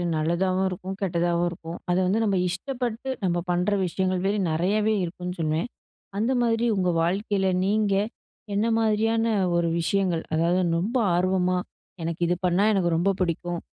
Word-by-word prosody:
நல்லதாவும் 185 Hz, +4 st, +1 dB
இருக்கும். 185 Hz, +1 st, -6 dB
கெட்டதாவும் 175 Hz, -1 st, +1 dB
இருக்கும். 165 Hz, 0 st, -8 dB
அதை 175 Hz, -, +2 dB
வந்து 210 Hz, +4 st, +2 dB
நம்ம 200 Hz, -3 st, +1 dB
இஷ்டப்பட்டு 245 Hz, +5 st, -4 dB
நம்ம 175 Hz, -2 st, +1 dB
பண்ணுற 180 Hz, +3 st, +1 dB
விஷயங்கள் 185 Hz, +1 st, -1 dB
வே 195 Hz, -, +3 dB, 0.2 s
நிறையாவே 205 Hz, +7 st, +1 dB
இருக்குன்னு 180 Hz, +1 st, -5 dB
சொல்லுவேன். 155 Hz, +6 st, 0 dB, 0.5 s
அந்த 225 Hz, +5 st, +1 dB
மாதிரி 230 Hz, 0 st, +1 dB
உங்க 180 Hz, -2 st, +1 dB
வாழ்க்கையில 195 Hz, +3 st, 0 dB, 0.2 s
நீங்க 205 Hz, 0 st, +2 dB, 0.6 s
என்ன 210 Hz, +3 st, +1 dB
மாதிரியான 225 Hz, +1 st, +2 dB, 0.3 s
ஒரு 170 Hz, -1 st, +2 dB
விஷயங்கள். 180 Hz, -1 st, 0 dB
அதாவது 170 Hz, +3 st, +2 dB, 0.2 s
ரொம்ப 210 Hz, +9 st, -1 dB, 0.2 s
ஆர்வமா, 180 Hz, 0 st, +1 dB, 0.4 s
எனக்கு 165 Hz, 0 st, -3 dB
இது 175 Hz, -, +1 dB
பண்ணா 180 Hz, +3 st, +2 dB
எனக்கு 185 Hz, -4 st, +1 dB
ரொம்ப 175 Hz, +4 st, +2 dB
பிடிக்கும். 175 Hz, -1 st, -1 dB
185 Hz, 145 wpm, -25 LUFS, 175-205 Hz, 0.6 s, வே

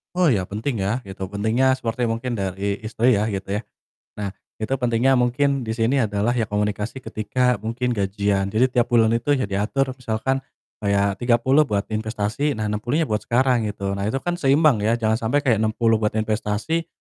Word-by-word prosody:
Oh, 180 Hz, -4 st, +4 dB
ya, 95 Hz, -6 st, 0 dB
penting 110 Hz, +4 st, -3 dB
ya, 105 Hz, +6 st, -1 dB
gitu. 95 Hz, -1 st, -6 dB
Pentingnya 110 Hz, +7 st, +2 dB
seperti 120 Hz, -1 st, -2 dB
mungkin 115 Hz, 0 st, -2 dB
dari 100 Hz, +1 st, -2 dB
istri 110 Hz, +1 st, +2 dB
ya 105 Hz, -, 0 dB
gitu 100 Hz, -1 st, -3 dB
ya. -, -, -7 dB, 0.6 s
Nah 100 Hz, -2 st, -3 dB, 0.2 s
itu 110 Hz, +4 st, -5 dB
pentingnya 120 Hz, +1 st, +2 dB
mungkin 130 Hz, +1 st, +1 dB
di 110 Hz, -, -2 dB
sini 120 Hz, +4 st, +2 dB
adalah 105 Hz, +3 st, 0 dB
ya 120 Hz, -3 st, 0 dB
komunikasi 105 Hz, +4 st, -2 dB
ketika 125 Hz, +3 st, 0 dB
mungkin 115 Hz, +3 st, -2 dB
gajian. 100 Hz, -2 st, 0 dB
Jadi 110 Hz, +5 st, +2 dB
tiap 120 Hz, -, +2 dB
bulan 115 Hz, -2 st, +4 dB
itu 120 Hz, +5 st, +2 dB
ya 130 Hz, -, -1 dB
diatur 105 Hz, +7 st, -1 dB
misalkan 125 Hz, +3 st, -1 dB, 0.4 s
kayak 100 Hz, -1 st, +1 dB
30 130 Hz, +5 st, +3 dB
buat 100 Hz, -1 st, 0 dB
investasi, 110 Hz, +6 st, -1 dB
nah 110 Hz, -1 st, -2 dB
60-nya 120 Hz, +10 st, 0 dB
buat 110 Hz, -8 st, -2 dB
sekarang 125 Hz, -2 st, +2 dB
gitu. 100 Hz, -1 st, -3 dB
Nah 100 Hz, +1 st, -2 dB
itu 110 Hz, -, -1 dB
kan 175 Hz, 0 st, -2 dB
seimbang 140 Hz, -, +4 dB
ya, 110 Hz, +3 st, +2 dB
jangan 110 Hz, -1 st, 0 dB
sampai 120 Hz, +5 st, +1 dB
kayak 120 Hz, -6 st, +2 dB
60 110 Hz, 0 st, +2 dB
buat 105 Hz, 0 st, -1 dB
investasi, 110 Hz, +9 st, -1 dB
110 Hz, 185 wpm, -22 LUFS, 105-125 Hz, 0.6 s, Oh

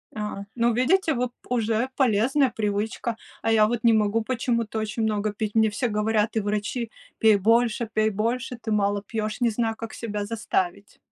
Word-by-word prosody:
А, 210 Hz, -2 st, -4 dB
ну, 235 Hz, -1 st, +2 dB
видите, 315 Hz, +8 st, +2 dB
вот 250 Hz, -1 st, -1 dB, 0.2 s
уже 230 Hz, 0 st, 0 dB
полезная 260 Hz, +2 st, +3 dB
привычка, 220 Hz, +1 st, -2 dB, 0.2 s
а 225 Hz, -, +1 dB
я 215 Hz, -1 st, +5 dB
вот 235 Hz, 0 st, -2 dB
не 230 Hz, -1 st, +6 dB
могу 215 Hz, +1 st, +2 dB
почему-то 230 Hz, -2 st, -1 dB
очень 220 Hz, +1 st, -2 dB
много 215 Hz, -1 st, 0 dB
пить. 210 Hz, 0 st, -3 dB
Мне 220 Hz, -1 st, +4 dB
все 225 Hz, +4 st, -1 dB
говорят, 215 Hz, +1 st, +1 dB
и -, -, +3 dB
врачи: 210 Hz, +3 st, -2 dB, 0.3 s
"Пей 220 Hz, -2 st, +6 dB
больше, 230 Hz, +2 st, +2 dB
пей 215 Hz, 0 st, +3 dB
больше, 230 Hz, +4 st, -2 dB
ты 225 Hz, -1 st, -5 dB
мало 205 Hz, -1 st, +1 dB
пьешь". 215 Hz, +1 st, -4 dB
Не 240 Hz, -, +4 dB
знаю, 225 Hz, 0 st, -1 dB
как 225 Hz, 0 st, -7 dB
себя 210 Hz, -3 st, -4 dB
заставить. 200 Hz, -3 st, -2 dB
220 Hz, 180 wpm, -25 LUFS, 210-235 Hz, 0.3 s, не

